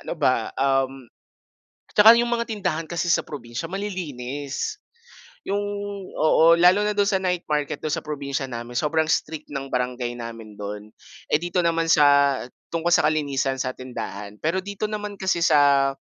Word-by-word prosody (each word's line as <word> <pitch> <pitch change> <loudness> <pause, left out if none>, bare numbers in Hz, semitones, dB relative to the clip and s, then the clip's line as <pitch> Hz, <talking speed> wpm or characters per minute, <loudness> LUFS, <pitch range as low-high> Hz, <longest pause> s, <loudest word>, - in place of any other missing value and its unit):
ano - - -4
ba, - - +1
um 135 -2 0 0.9
'Tsaka 215 +2 +9
yung 240 - +1
mga 235 0 0
tindahan 175 -7 -2
kasi 170 0 -2
sa - - +2
probinsya 125 +2 -7
malilinis, 155 - -4 0.7
yung 200 +1 0 0.6
oo, 165 +2 +5
lalo 180 +4 +5
na 210 - -2
do'n 200 -1 +3
sa 190 -2 +1
night 180 -1 -1
market 150 -2 -1
do'n 155 -1 -3
sa - - -1
probinsya 140 -3 -4
namin 120 0 -6
sobrang 160 +5 +1
strict 155 -1 -1
ng 135 -1 -4
barangay 125 -1 -2
namin 115 -3 -8
don. 105 +1 -7 0.4
Eh, - - +5
dito 175 +2 -1
naman 165 -1 +1
sa 140 -3 +5 0.3
tungkol 165 +1 0
sa 175 - +4
kalinisan 140 -4 0
sa 130 0 -2
tindahan, 105 -5 -7
pero 165 +4 0
dito 205 +1 -3
naman 210 -1 -5
kasi 180 -3 +1
sa 140 -2 +4
150 Hz, 160 wpm, -23 LUFS, 130-175 Hz, 0.9 s, Tsaka